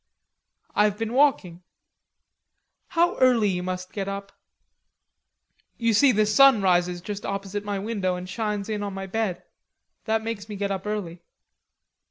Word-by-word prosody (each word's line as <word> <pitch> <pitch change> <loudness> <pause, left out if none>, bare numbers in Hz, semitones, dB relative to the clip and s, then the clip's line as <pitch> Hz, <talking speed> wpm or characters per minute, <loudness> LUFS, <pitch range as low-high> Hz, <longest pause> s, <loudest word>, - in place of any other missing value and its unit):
"I've 210 -1 +2
been 225 +1 -3
walking." 245 - +2 1.3
"How 345 +1 +1
early 245 -5 +4
you 180 -2 -1
must 185 0 -5
get 195 -2 -3
up!" 200 0 -5 1.5
"You 230 -1 +1
see, 265 +6 +5
the 215 -2 +2
sun 230 0 +5
rises 180 -1 +2
just 205 +2 -6
opposite 200 +1 -4
my 205 -1 -3
window, 195 -3 -2
and 180 0 -7
shines 210 0 -3
in 215 -1 -3
on 200 -1 -4
my 195 0 -5
bed. 195 -2 -2 0.6
That 220 0 0
makes 220 -2 -5
me 210 - -5
get 200 0 -2
up 195 +1 -4
early." 180 -5 -4
205 Hz, 150 wpm, -25 LUFS, 190-220 Hz, 1.5 s, see